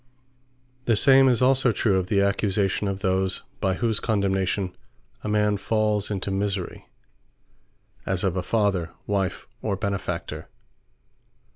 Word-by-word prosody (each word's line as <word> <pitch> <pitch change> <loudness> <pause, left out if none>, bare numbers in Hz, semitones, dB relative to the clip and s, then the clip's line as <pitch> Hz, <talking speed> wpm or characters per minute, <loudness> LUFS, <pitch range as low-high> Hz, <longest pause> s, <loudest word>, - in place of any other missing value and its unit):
The 115 - +3
same 135 +4 +6
is 125 0 +2
also 130 -1 +4
true, 105 -2 +1
of 90 - -3
the 100 0 +2
Accusation 100 0 0
of 100 0 -3
those, 95 0 0 0.2
by 95 -1 +1
whose 115 -1 0
Condemnation 95 -3 0 0.5
a - - -4
man 105 -1 +2
falls 105 -1 0
into 100 -1 -2
misery; 100 -2 -3 1.1
as 95 -1 -1
of 95 -2 0
a 95 - 0
Father, 95 -4 0 0.2
Wife, 95 -2 -2
or 105 -2 -1
Benefactor. 100 0 -4
100 Hz, 130 wpm, -25 LUFS, 95-105 Hz, 1.1 s, same